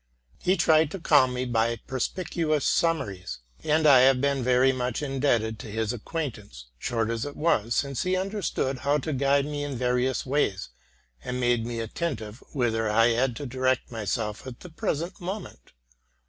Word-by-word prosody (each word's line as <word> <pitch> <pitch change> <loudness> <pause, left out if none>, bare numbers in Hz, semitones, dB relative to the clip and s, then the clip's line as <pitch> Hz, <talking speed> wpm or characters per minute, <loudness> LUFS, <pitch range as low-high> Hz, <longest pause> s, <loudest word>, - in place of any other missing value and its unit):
He 185 +2 +2
tried 160 -2 +4
to 195 - -6
calm 145 -6 +4
me 125 +1 -1
by 115 -1 +1
perspicuous 155 +2 -1
summaries; 105 - 0 0.3
and 155 +1 +2
I 140 -4 +8
have 130 0 +5
been 140 0 +1
very 125 +1 +4
much 125 +1 -2
indebted 125 -6 0
to - - -8
his 110 +2 -2
ac 120 - -7
quaintance, 110 - -5
short 115 - -1
as 115 -1 -2
it 145 0 -6
was, 120 -8 +1
since 140 -3 -1
he 185 0 +1
understood 185 -9 -2
how 145 +1 +2
to 155 +1 -3
guide 140 +1 +2
me 145 -1 -3
in 140 -3 -4
various 125 +1 0
ways, 130 -8 0 0.5
and 125 0 -3
made 120 -2 +1
me 120 -1 -4
attentive 115 -2 -4
whither 115 -5 0
I 115 +2 +4
had 120 +1 +1
to 145 - -6
direct 130 0 0
myself 110 +1 -3
at 125 -2 -9
the 180 - -10
present 170 +3 -3
moment. 180 - -7
130 Hz, 175 wpm, -26 LUFS, 115-150 Hz, 0.5 s, I